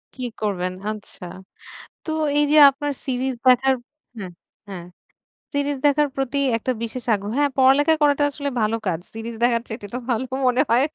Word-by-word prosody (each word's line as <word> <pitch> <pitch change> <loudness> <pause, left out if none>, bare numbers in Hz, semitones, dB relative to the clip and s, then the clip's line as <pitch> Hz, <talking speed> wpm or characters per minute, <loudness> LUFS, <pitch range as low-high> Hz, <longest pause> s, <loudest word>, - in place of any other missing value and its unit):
কি 255 - -6 0.2
করবেন? 185 -3 -2 0.2
আচ্ছা। 210 -3 -10 0.8
তো 315 - -5 0.3
এইযে 295 +1 +3
আপনার 290 +1 -4
সিরিজ 260 0 -1
দেখার 265 +1 +4 0.4
হ্যাঁ, 185 -4 -7 0.4
হ্যাঁ, 180 -3 -8 0.7
সিরিজ 285 0 -1
দেখার 290 +1 +3
প্রতি 270 +1 -2 0.2
একটা 255 +3 -2
বিশেষ 230 +1 -5
আগ্রহ 205 +1 -4
হ্যাঁ, 290 -1 +2
পড়ালেখা 275 +4 +5
করাটা 290 0 +3
আসলে 285 0 -4
ভালো 215 +1 +1
কাজ। 170 -4 0 0.2
সিরিজ 225 +1 -6
দেখার 235 -1 +2
চাইতে 220 -2 -7
তো 250 - -1
ভালো 240 +2 0 0.2
মনে 250 +2 +3
হয়। 245 +4 +4
255 Hz, 160 wpm, -22 LUFS, 220-285 Hz, 0.8 s, পড়ালেখা